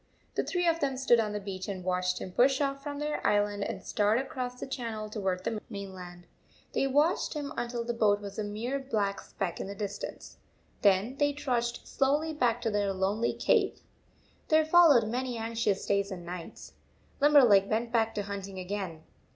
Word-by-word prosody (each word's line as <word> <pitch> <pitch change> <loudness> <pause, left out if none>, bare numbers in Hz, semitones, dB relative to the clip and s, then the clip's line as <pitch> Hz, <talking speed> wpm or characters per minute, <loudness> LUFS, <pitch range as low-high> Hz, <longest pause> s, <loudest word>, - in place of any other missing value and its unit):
The - - 0
three 355 -2 0
of 330 0 +2
them 275 -3 -1
stood 250 -3 +4
on 215 -2 0
the 210 - -3
beach 190 -2 -6
and 190 -3 -5
watched 180 0 0
him 185 - -6
push 260 +7 +3
off 275 -1 -1
from 285 0 -5
their 300 +1 -3
island 205 -1 +1
and - - -5
start 210 +1 +2
across 250 -1 -4
the - - -4
channel 225 -5 -5
toward 190 -4 -2
the 220 0 -2
main 200 -3 -6
land. 175 -1 -10 0.5
They 275 - +1
watched 295 +6 +2
him 295 0 -4
until 240 0 -3
the 240 +1 -2
boat 210 -3 +3
was 200 0 -7
a - - 0
mere 225 +7 -3
black 210 -7 -1
speck 180 -4 -4
in - - -4
the 200 - -6
distance. 205 0 -6 0.4
Then 205 +6 +3
they 290 0 +2
trudged 240 -5 -2
slowly 295 +4 +1
back 240 -5 +1
to 225 - 0
their 205 -1 +1
lonely 195 +5 0
cave. - - +1 0.7
There 315 0 +4
followed 315 -8 +6
many 250 +1 -2
anxious 225 -3 -1
days 200 0 +1
and 180 -3 -7
nights. 175 -1 -8 0.5
Limberleg 255 -10 +6
went 230 +2 0
back 225 -2 +1
to 205 - -1
hunting 195 -1 -6
again. 185 -4 -5
220 Hz, 190 wpm, -29 LUFS, 200-265 Hz, 0.7 s, followed